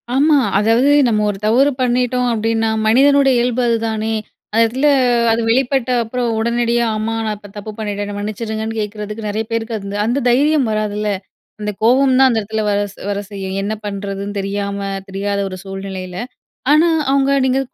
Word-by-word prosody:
ஆமா. 295 +2 +4 0.2
அதாவது 230 +6 +3 0.2
நம்ம 215 -3 +1
ஒரு 200 - -3
தவறு 260 +7 +4
பண்ணிட்டோம் 250 0 +1
அப்பிடின்னா, 225 0 0 0.2
மனிதனுடைய 275 +3 +5
இயல்பு 245 +1 0
அதுதானே! 225 -1 -1 0.4
அந்த 225 +2 +3
இடத்தில 255 +6 +1 0.4
அது 230 - +1
வெளிப்பட்ட 260 +1 +1
அப்புறம், 240 +1 -2
உடனடியா 235 +1 +1
"ஆமா 215 +1 -2
நான் 215 -1 -1
இப்ப 205 -1 -14
தப்பு 205 +1 -6
பண்ணிட்டேன் 205 -1 -3
என்ன 205 - -6
மன்னிச்சிருங்க"ன்னு 220 +1 -4
கேட்கிறதுக்கு 210 +1 -5
நிறைய 215 +2 -2
பேருக்கு 230 0 -2
அது 200 0 -5
அந்த 245 +3 0
தைரியம் 285 +1 +3
வராதுல்ல. 210 0 -1 0.5
அந்த 210 0 -2
கோவம் 260 +3 +4
தான் 265 - +7
அந்த 225 - +1
இடத்தில 220 +1 -3
வர 205 0 +1 0.3
வர 200 0 -1
செய்யும். 190 -1 -5
என்ன 205 +2 -2
பண்ணுறதுன்னு 200 0 -4
தெரியாம, 200 0 -3 0.3
தெரியாத 200 +1 -2
ஒரு 185 - -7
சூழ்நிலையில. 195 -2 -6 0.5
ஆனா, 315 +3 +5 0.2
அவுங்க 275 0 +2
நீங்க 260 +1 +2
220 Hz, 160 wpm, -18 LUFS, 205-245 Hz, 0.5 s, தான்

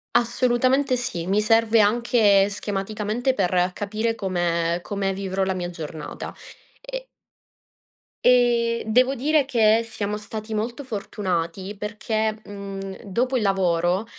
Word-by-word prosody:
Assolutamente 255 +2 +2
sì. 175 -9 -4
Mi 195 +2 +2
serve 225 +1 +4
anche 205 -2 +4
schematicamente 210 +5 -2
per 180 -1 +1
capire 220 +3 -2
come 175 -3 0
come 195 +1 -2
vivrò 190 0 -2
la 190 - 0
mia 175 -1 -3
giornata. 160 -3 -7 0.5
E - - -7 1.2
e 240 -2 +3
devo 255 +5 +3
dire 295 +3 +2
che 230 -3 +3
siamo 210 -2 -3
stati 215 +1 -7
molto 235 +6 -3
fortunati 195 -4 -3
perché, 215 +1 -2
mhmm, 195 -1 -7
dopo 250 +6 0
il - - 0
lavoro 185 0 +1
210 Hz, 120 wpm, -23 LUFS, 195-235 Hz, 1.2 s, serve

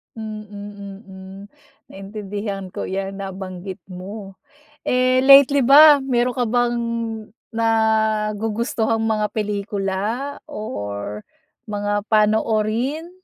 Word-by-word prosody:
Mm-mm, 200 -2 -9 0.4
naintindihan 200 -1 -6
ko - - -5
'yan 195 +1 -4
nabanggit 190 0 -7
mo. 195 +1 -8 0.5
Eh, 255 +1 +2
lately 275 0 +7
ba 290 +3 +8
meron 250 -2 0
ka 250 - 0
bang 240 0 +1 0.8
nagugustuhang 220 0 +1
mga 215 -1 +1
pelikula 210 +5 -2
or 105 - -5 0.5
mga 205 0 -1
panoorin? 220 +7 +1
215 Hz, 80 wpm, -21 LUFS, 195-235 Hz, 0.8 s, ba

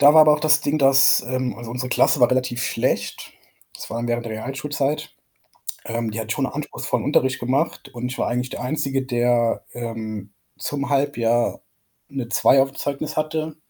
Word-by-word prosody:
da 145 +1 +8
war 155 - +9
aber 155 0 +7
auch 150 - 0
das 155 0 +4
Ding, 145 +1 0
dass, 135 -1 +5
ähm 130 -3 -2
also, 115 -1 -8
unsere 125 +1 -3
Klasse 140 - +3
war 120 +1 +5
relativ 125 -2 0
schlecht. - - -2 0.4
Das - - -8
war 115 +1 -3
während 120 0 -1
der 115 - -5
Realschulzeit. 135 +5 -3 0.7
Ähm, 115 -1 -2
die 110 - -5
hat 110 0 -3
schon 140 - -1
'n - - -5
anspruchsvollen 150 +1 -3
Unterricht 130 -2 +2
gemacht 130 +3 -1
und 120 +1 -3
ich 135 - -6
war - - 0
eigentlich 125 +1 -2
der - - -5
Einzige, 135 0 -1
der, 120 -2 +1
ähm, 110 -4 -6 0.3
zum 140 -1 -3
Halbjahr 120 -4 +1 0.5
'ne 135 -4 -5
2 135 - +5
auf'm 135 0 0
Zeugnis 145 +3 -4
hatte. 155 0 -2
130 Hz, 185 wpm, -22 LUFS, 120-145 Hz, 0.7 s, war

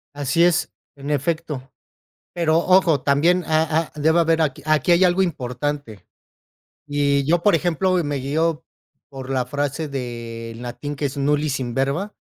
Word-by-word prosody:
Así 145 +4 +1
es, 175 -1 +2 0.2
en 140 0 -8
efecto. 145 -2 -2 0.6
Pero, 165 -2 +2
ojo, 175 -5 +3
también, 165 +7 +2
a 160 0 +1
a 150 - -10
Debe 160 +3 +3
haber 165 -1 +2
aq 145 -4 -1
aquí 155 +1 +2
hay 175 +2 +5
algo 180 +1 +3
importante. 140 - -3 0.8
Y 140 -1 +1
yo, 170 +3 +2
por 205 - +5
ejemplo, 175 +2 0
me 145 -1 -2
guío 155 +4 -1 0.5
por 135 -1 -9
la 130 -2 0
frase 145 +3 -3
del 115 -3 -6
latín, 125 +4 -6
que 145 - -3
es: 140 +1 -3
Nullius 145 0 0
in 120 -2 -4
verba, 140 +10 -1
145 Hz, 155 wpm, -21 LUFS, 135-165 Hz, 0.8 s, hay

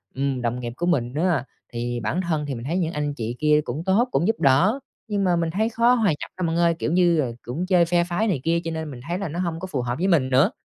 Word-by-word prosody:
ừm, 135 -2 -1
đồng 120 +1 -1
nghiệp 120 -1 -5
của 175 - -1
mình 130 -8 0
á, 170 -1 +1 0.3
thì 120 0 -2
bản 130 +12 -1
thân 160 -4 -1
thì 140 - -3
mình 115 - -7
thấy 165 +6 -1
những 170 -2 -1
anh 145 -1 -2
chị 120 -2 -4
kia 150 0 +4
cũng 150 +5 -4
tốt, 205 +6 +3
cũng 165 +8 +1
giúp 225 - 0
đỡ, 145 - +4 0.3
nhưng 205 -2 -1
mà 180 -2 +3
mình 165 -1 0
thấy 215 +6 0
khó 235 +1 +3
hòa 225 -6 +2
nhập 150 - -3
lắm 180 -2 -1
bạn 165 - -1
ơi, 170 -1 +3
kiểu - - -1
như, 175 -2 +3
ờ, 125 -5 -1
cũng 145 +9 -4
chơi 180 -2 +4
phe 175 0 +2
phái 175 +6 -1
này 180 -9 0
kia 170 +1 +2
cho 165 - -3
nên 160 -2 -4
mình 125 - -9
thấy 175 +2 -1
là 200 - -3
nó 165 +4 -5
hông 170 -3 -2
có 190 - -5
phù 135 -8 -2
hợp 120 0 -2
với 185 - 0
mình 155 -9 +3
nữa. 130 +1 +4
165 Hz, 300 wpm, -23 LUFS, 135-180 Hz, 0.3 s, kia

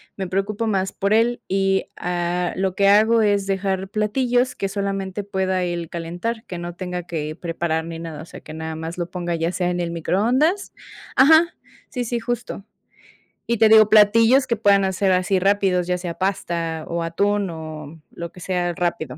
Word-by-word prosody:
Me 190 -1 -4
preocupo 200 +4 -2
más 195 -3 0
por 200 +2 0
él 235 +2 +2
y, 195 0 +1
ah, 175 0 -1
lo 190 -1 -1
que 200 +1 +2
hago 220 +3 +5
es 205 -2 +2
dejar 190 -1 -1
platillos 245 +4 0
que 195 - -2
solamente 195 0 -3
pueda 190 -2 -1
él 175 -2 -3
calentar, 175 +8 -4
que 185 -5 -7
no 175 0 -6
tenga 180 -1 -4
que 155 -3 -4
preparar 165 -2 -2
ni 165 -1 -7
nada, 165 -2 -7
o - - -9
sea, - - -11
que 155 - -11
nada 160 0 -5
más 160 +2 -6
lo 175 -1 -3
ponga 175 -2 -3
ya 165 +1 -1
sea 180 -1 -1
en 175 - -2
el 170 -1 -2
microondas 245 - +1 0.4
Ajá, 315 +5 +6 0.4
sí, 250 -3 -3
sí, 235 +1 -2
justo. 235 -3 -4 0.8
Y 235 - +1
te 220 +1 +6
digo, 215 -1 +7
platillos 225 +5 +5
que 240 -3 0
puedan 200 -2 +3
hacer 190 0 +1
así 185 +1 +2
rápidos, 190 -2 +2
ya 180 0 0
sea 175 -1 -5
pasta 170 -4 -2
o 170 0 -2
atún, 200 +4 0
o 155 -1 -8
lo 170 -1 -7
que 180 - -14
sea 175 -1 -1
rápido. 170 -3 -2
190 Hz, 190 wpm, -22 LUFS, 175-210 Hz, 0.8 s, digo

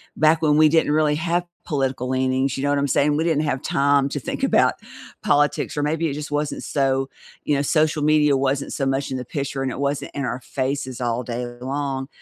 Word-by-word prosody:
back 155 +1 +3
when 150 -1 +4
we 155 0 +6
didn't 160 -1 +2
really 150 -1 +2
have 170 +3 0 0.2
political 135 -4 -1
leanings, 130 +1 0
you 135 - -4
know 145 - +1
what 145 - +2
I'm 140 0 +1
saying? 145 +2 +2
We 160 - +1
didn't 160 -2 +1
have 135 -3 -2
time 140 0 +2
to - - -3
think - - -5
about - - +3 0.5
politics 145 0 +1
or 145 - -1
maybe 160 +3 0
it 145 - -3
just 150 +1 -5
wasn't 150 0 -2
so 135 -1 0 0.4
you 145 - +2
know, 140 - +1
social 155 0 +1
media 150 -2 +4
wasn't 135 +1 -1
so 135 - -1
much 135 0 -1
in 130 - -2
the 125 - -6
picture, 140 +1 -4
and 130 - -1
it 125 - -6
wasn't 140 0 -2
in 140 - -2
our 125 - -3
faces 130 -1 -3
all 120 0 -1
day 120 +1 -4 0.2
long. 135 0 -3
140 Hz, 225 wpm, -22 LUFS, 135-150 Hz, 0.5 s, we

